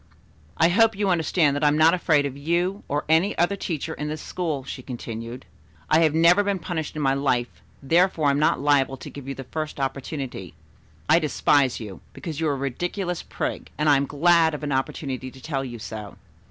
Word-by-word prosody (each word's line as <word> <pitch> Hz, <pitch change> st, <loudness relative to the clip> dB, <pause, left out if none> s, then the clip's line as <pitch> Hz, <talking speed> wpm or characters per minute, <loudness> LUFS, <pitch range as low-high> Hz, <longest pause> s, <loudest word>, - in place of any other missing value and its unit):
"I 165 Hz, -, +5 dB
hope 225 Hz, +4 st, +4 dB
you 200 Hz, -1 st, +1 dB
understand 165 Hz, -4 st, +2 dB
that 145 Hz, -, -2 dB
I -, -, +5 dB
am 145 Hz, +1 st, +3 dB
not 160 Hz, +1 st, +6 dB
afraid 155 Hz, -5 st, +2 dB
of 140 Hz, -2 st, -4 dB
you 175 Hz, +7 st, -1 dB
or 145 Hz, +1 st, -2 dB
any 160 Hz, +6 st, +3 dB
other 175 Hz, +4 st, +2 dB
teacher 160 Hz, -4 st, -4 dB
in 150 Hz, -, -5 dB
this 155 Hz, +1 st, -4 dB
school," 160 Hz, -7 st, -3 dB
she 130 Hz, 0 st, -7 dB
continued. 115 Hz, -1 st, -7 dB, 0.5 s
"I 155 Hz, -, +6 dB
have 160 Hz, -2 st, +3 dB
never 170 Hz, +5 st, +5 dB
been 200 Hz, -1 st, 0 dB
punished 165 Hz, -4 st, -4 dB
in 155 Hz, -, -2 dB
my 135 Hz, -1 st, +3 dB
life, 130 Hz, -3 st, -1 dB, 0.2 s
therefore 170 Hz, +2 st, +2 dB
I 140 Hz, -, +5 dB
am 140 Hz, -, 0 dB
not 150 Hz, -, +2 dB
liable 135 Hz, -1 st, +2 dB
to -, -, -9 dB
give 140 Hz, -2 st, -10 dB
you 135 Hz, -, -4 dB
the 135 Hz, -, -7 dB
first 155 Hz, +3 st, -5 dB
opportunity. 135 Hz, -, -4 dB, 0.5 s
I 165 Hz, -, +5 dB
despise 145 Hz, -4 st, +2 dB
you, 105 Hz, -5 st, -8 dB
because 160 Hz, -3 st, -6 dB
you 160 Hz, -, 0 dB
are -, -, +1 dB
a 140 Hz, 0 st, -2 dB
ridiculous 175 Hz, +5 st, -3 dB
prig, -, -, -4 dB
and 150 Hz, +2 st, 0 dB
I 145 Hz, -, +6 dB
am 140 Hz, 0 st, +1 dB
glad 160 Hz, +1 st, +3 dB
of 150 Hz, -, -8 dB
an 145 Hz, -, -2 dB
opportunity 130 Hz, -1 st, -2 dB
to 130 Hz, -, -15 dB
tell 135 Hz, 0 st, -3 dB
you 120 Hz, -3 st, -6 dB
so. 105 Hz, -1 st, -8 dB
150 Hz, 215 wpm, -24 LUFS, 135-165 Hz, 0.5 s, not